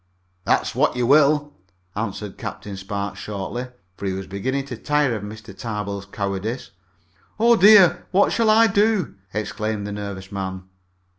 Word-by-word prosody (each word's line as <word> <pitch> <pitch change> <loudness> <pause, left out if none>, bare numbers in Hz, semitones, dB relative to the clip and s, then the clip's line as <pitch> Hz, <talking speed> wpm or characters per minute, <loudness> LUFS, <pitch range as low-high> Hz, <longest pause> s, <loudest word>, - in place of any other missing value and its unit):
"That's - - +1
what - - +2
you 125 -1 0
will," 145 +2 +4 0.4
answered 105 -1 -4
Captain 100 -1 -6
Spark 100 +1 -4
shortly, 105 +5 -5 0.3
for 100 - -4
he 95 - -1
was 95 0 -5
beginning 130 +9 -2
to 130 - -6
tire 145 +2 +1
of 105 - -4
Mr. 105 -1 -9
Tarbill's 100 -3 -4
cowardice. 100 +4 -4 0.7
"Oh, 235 +1 +6
dear! 205 -3 +6
What 195 +2 +3
shall 230 -2 +2
I 225 +1 +6
do?" 205 -3 +2 0.2
exclaimed 105 0 -3
the 105 - -5
nervous 100 -2 -6
man. 95 -1 -4
110 Hz, 150 wpm, -22 LUFS, 100-145 Hz, 0.7 s, Oh